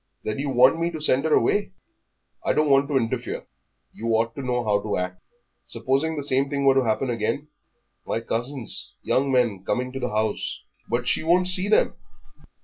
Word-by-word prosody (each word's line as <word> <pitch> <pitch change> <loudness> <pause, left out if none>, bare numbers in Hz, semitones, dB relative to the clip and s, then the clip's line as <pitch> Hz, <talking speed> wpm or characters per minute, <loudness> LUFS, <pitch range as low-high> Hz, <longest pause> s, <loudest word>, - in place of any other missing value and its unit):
"Then 110 +4 -3
you 140 0 -2
want 130 +4 +5
me 170 +1 +1
to 160 -2 -6
send 140 -1 +2
her 160 - +2
away?" 205 -2 +1 0.7
"I - - +1
don't 150 -1 +2
want 135 +1 +4
to 140 -2 +1
interfere; 115 -3 -2 0.5
you 115 - -6
ought 115 +1 +1
to 140 - -6
know 125 -2 -1
how 105 -2 +1
to 105 0 -2
act. 90 0 -4 0.4
Supposing 140 +5 0
the 145 - -3
same 135 0 +1
thing 140 -1 -1
were 135 - +6
to 135 0 +3
happen 120 +3 0
again? 115 +6 -2 0.6
My - - -1
cousins, 120 +2 -2
young 135 +1 +1
men, 120 -7 +1
coming 125 +5 -1
to 135 - -5
the 125 -1 -2
house 110 -1 -2
" - - -35
"But 120 +1 -1
she - - +2
won't 180 +3 +3
see 185 +1 +3
them." 215 - +3
130 Hz, 200 wpm, -24 LUFS, 115-145 Hz, 0.7 s, were